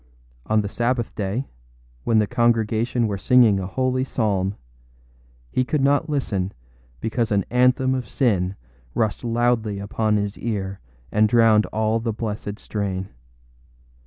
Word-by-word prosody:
On 110 0 +3
the 100 - -3
Sabbath 120 +2 -1
day, 105 +6 -2 0.6
when 115 - +3
the 105 - +4
congregation 120 0 +1
were 100 -3 -2
singing 115 -3 +5
a 95 - -3
holy 130 +4 0
psalm, 100 -6 0 1.0
he 130 - +1
could 135 +2 0
not 145 +3 +2
listen 100 -10 -1 0.5
because 110 - -1
an 100 -2 +2
anthem 125 +1 +3
of 130 -2 -3
sin 100 -8 +1 0.4
rushed 110 +1 0
loudly 115 -3 +1
upon 105 +2 0
his 100 0 -3
ear 100 -4 -3 0.3
and 105 0 +3
drowned 110 -2 +5
all 110 +1 0
the 115 -1 -2
blessed 105 -1 -4
strain. 95 -3 -3
110 Hz, 135 wpm, -23 LUFS, 100-120 Hz, 1.0 s, singing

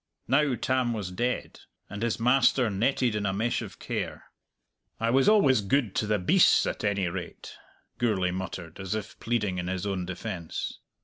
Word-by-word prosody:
Now 140 -1 +3
Tam 130 -1 0
was 100 -5 -4
dead, 120 +7 -2 0.3
and 100 +1 -7
his 115 -1 0
master 125 -1 +3
netted 120 +4 +1
in 105 -1 -1
a 95 - 0
mesh 115 +4 0
of - - -8
care. - - -5 0.7
"I 115 +1 +1
was 135 - +4
always 140 - +5
gude 110 +1 +1
to 110 - 0
the 105 0 +2
beasts, 90 - +4
at - - -3
any 100 -3 +1
rate," 85 0 -6 0.5
Gourlay 100 -7 +1
muttered, 90 -2 -6
as 95 +2 -3
if 110 0 -6
pleading 105 -6 -1
in 90 - -3
his 95 +1 -2
own 95 -3 -2
defence. 85 -2 -5
105 Hz, 175 wpm, -27 LUFS, 95-120 Hz, 0.7 s, always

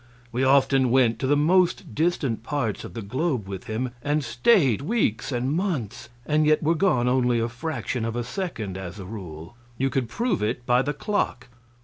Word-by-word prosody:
We 125 +2 0
often 135 -1 +4
went 120 -3 +3
to 130 - -1
the 145 +1 +3
most 175 -3 +2
distant 150 -6 0
parts 125 -5 -2
of - - -9
the 115 - -5
globe 130 - -1
with 95 -1 -6
him, 120 +3 -3
and 145 +3 0
stayed 130 - +3
weeks 145 - 0
and 125 +2 -1
months, 160 - -2 0.2
and 155 0 +2
yet 155 0 +3
were 160 +2 +3
gone 155 -8 +2
only 125 -2 +2
a 115 - 0
fraction 125 -1 -4
of 115 0 -2
a 120 - -1
second, 115 - -4
as 90 -1 -7
a 95 - -8
rule. 90 -3 -8 0.2
You 135 0 0
could 125 -3 -1
prove 230 - -1
it 115 +3 -2
by 125 0 +4
the 145 +2 -2
clock. 135 - -2
130 Hz, 195 wpm, -25 LUFS, 115-150 Hz, 0.2 s, often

